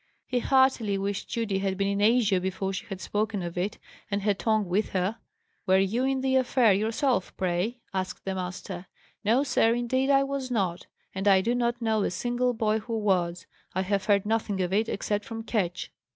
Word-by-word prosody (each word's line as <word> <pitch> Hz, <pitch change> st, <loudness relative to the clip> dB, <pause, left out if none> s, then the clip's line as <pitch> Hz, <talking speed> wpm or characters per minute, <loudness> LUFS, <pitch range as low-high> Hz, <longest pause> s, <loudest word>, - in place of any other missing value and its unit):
He 250 Hz, -, 0 dB
heartily 260 Hz, -6 st, +3 dB
wished 200 Hz, 0 st, -3 dB
Judy 215 Hz, -5 st, -1 dB
had 195 Hz, -1 st, -1 dB
been 195 Hz, 0 st, +1 dB
in 200 Hz, 0 st, 0 dB
Asia 210 Hz, -4 st, +4 dB
before 190 Hz, +1 st, -2 dB
she 190 Hz, -, -5 dB
had 195 Hz, -, -6 dB
spoken 210 Hz, -1 st, -2 dB
of 170 Hz, -1 st, -5 dB
it, 185 Hz, +4 st, -2 dB, 0.3 s
and 200 Hz, -1 st, -1 dB
her 205 Hz, 0 st, +3 dB
tongue 215 Hz, +1 st, +1 dB
with 200 Hz, +5 st, 0 dB
her. 190 Hz, +4 st, 0 dB, 0.5 s
"Were 190 Hz, 0 st, +5 dB
you 205 Hz, +7 st, +1 dB
in 265 Hz, -1 st, 0 dB
the 265 Hz, 0 st, +2 dB
affair 245 Hz, -4 st, +4 dB
yourself, 225 Hz, +2 st, 0 dB
pray?" 185 Hz, +6 st, -1 dB, 0.2 s
asked 185 Hz, -1 st, -4 dB
the 195 Hz, -, -1 dB
master. 185 Hz, 0 st, -5 dB, 0.4 s
"No, 230 Hz, +6 st, +3 dB
sir, 235 Hz, -4 st, +3 dB
indeed 260 Hz, +3 st, 0 dB
I 275 Hz, -1 st, +5 dB
was 275 Hz, -1 st, -3 dB
not; 190 Hz, -8 st, -1 dB, 0.3 s
and 195 Hz, +2 st, -2 dB
I 190 Hz, -1 st, +6 dB
do 235 Hz, +5 st, 0 dB
not 240 Hz, -1 st, 0 dB
know 220 Hz, -1 st, +2 dB
a -, -, +1 dB
single 245 Hz, +5 st, 0 dB
boy 220 Hz, -1 st, +1 dB
who 225 Hz, +1 st, -4 dB
was. 180 Hz, -5 st, 0 dB, 0.3 s
I 190 Hz, -, +1 dB
have 195 Hz, 0 st, -1 dB
heard 200 Hz, -2 st, +3 dB
nothing 215 Hz, -2 st, 0 dB
of 180 Hz, +1 st, -2 dB
it, 220 Hz, +3 st, +2 dB
except 205 Hz, +1 st, -1 dB
from 225 Hz, 0 st, -6 dB
Ketch." 185 Hz, -6 st, -2 dB
210 Hz, 200 wpm, -27 LUFS, 190-240 Hz, 0.5 s, I